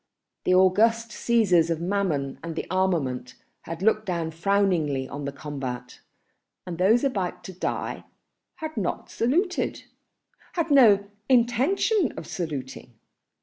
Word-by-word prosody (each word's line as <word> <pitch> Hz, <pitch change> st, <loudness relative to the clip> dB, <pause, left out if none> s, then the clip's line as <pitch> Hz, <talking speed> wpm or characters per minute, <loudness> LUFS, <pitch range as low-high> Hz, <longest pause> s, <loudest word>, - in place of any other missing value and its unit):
The 185 Hz, -, +4 dB
august 220 Hz, +5 st, +3 dB
Cæsars 200 Hz, -9 st, +3 dB
of 165 Hz, -2 st, 0 dB
Mammon 170 Hz, -7 st, -1 dB
and 165 Hz, -1 st, -4 dB
armament 145 Hz, -10 st, 0 dB, 0.3 s
had 165 Hz, +2 st, -6 dB
looked 215 Hz, 0 st, +2 dB
down 170 Hz, -3 st, -2 dB
frowningly 165 Hz, -6 st, +1 dB
on 140 Hz, +1 st, -6 dB
the 140 Hz, -, -3 dB
combat, 135 Hz, -4 st, -6 dB, 0.7 s
and 175 Hz, -2 st, -6 dB
those 220 Hz, +7 st, +4 dB
about 190 Hz, -9 st, -2 dB
to 190 Hz, -, -8 dB
die 185 Hz, -, -3 dB, 0.5 s
had 315 Hz, -2 st, -6 dB
not 190 Hz, -5 st, -3 dB
saluted, 355 Hz, -, 0 dB, 0.7 s
had 335 Hz, -3 st, -1 dB
no 210 Hz, -8 st, +6 dB, 0.2 s
intention 265 Hz, -, +2 dB
of -, -, -6 dB
saluting. 135 Hz, -7 st, -6 dB
185 Hz, 120 wpm, -25 LUFS, 155-230 Hz, 0.7 s, no